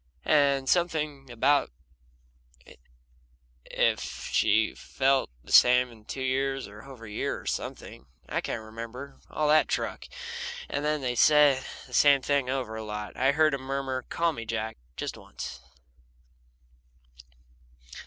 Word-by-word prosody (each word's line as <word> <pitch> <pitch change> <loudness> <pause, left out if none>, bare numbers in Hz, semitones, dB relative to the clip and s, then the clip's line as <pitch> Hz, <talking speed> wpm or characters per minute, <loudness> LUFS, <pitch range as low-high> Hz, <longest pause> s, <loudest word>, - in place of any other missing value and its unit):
And 140 -3 +3
something 155 -5 0
about 140 +5 +2 2.0
if - - +1 0.3
she 110 +2 +3
felt 135 0 +1
the - - -12
same 125 0 +6
in 110 -2 -17
two 130 - -5
years, 135 +1 -1
or 105 +1 -12
a 115 -3 -11
year, - - -2
or - - -14
something 70 - -5 0.2
I - - -1
can't 110 - -4
remember 115 +5 -8
all 155 - 0
that 155 +1 +5
truck - - -2 0.6
and 145 - -3
they 150 -5 0
said 145 0 +5 0.2
the - - -16
same 140 -2 +5
thing 140 -3 +1
over 130 -4 -2
a 110 - -5
lot. 105 -1 -6
I 135 +2 +3
heard 155 +1 +3
him 140 - -2
murmur: 135 -1 -2
"Call 165 -1 +1
me 115 - -6
Jack, 110 0 -3 0.2
just - - -4
once." - - -8
135 Hz, 135 wpm, -28 LUFS, 115-145 Hz, 2.0 s, same